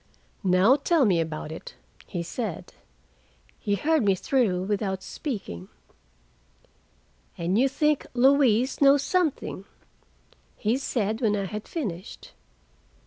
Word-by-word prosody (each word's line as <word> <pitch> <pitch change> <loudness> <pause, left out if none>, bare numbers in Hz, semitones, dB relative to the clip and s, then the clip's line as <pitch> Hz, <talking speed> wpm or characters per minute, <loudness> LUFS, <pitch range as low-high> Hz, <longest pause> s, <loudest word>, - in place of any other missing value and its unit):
"Now 190 +8 +5
tell 300 0 +2
me 180 -6 +3
about 155 -1 -5
it," 160 - -9 0.3
he 175 -2 -4
said. 205 +1 -5 0.9
He 205 - 0
heard 315 +4 +1
me 195 -2 +3
through 190 -4 +1
without 195 -1 -2
speaking. 190 - -6 1.7
"And 170 +3 -1
you 260 +5 +4
think 300 +2 +1
Louise 260 -1 +3
knows 280 0 +6
something?" 315 - -1 0.9
he 220 +3 +1
said 220 -4 -1
when 215 -3 +2
I 200 -1 -2
had 210 +2 -6
finished. 200 - -6
215 Hz, 115 wpm, -26 LUFS, 190-275 Hz, 1.7 s, knows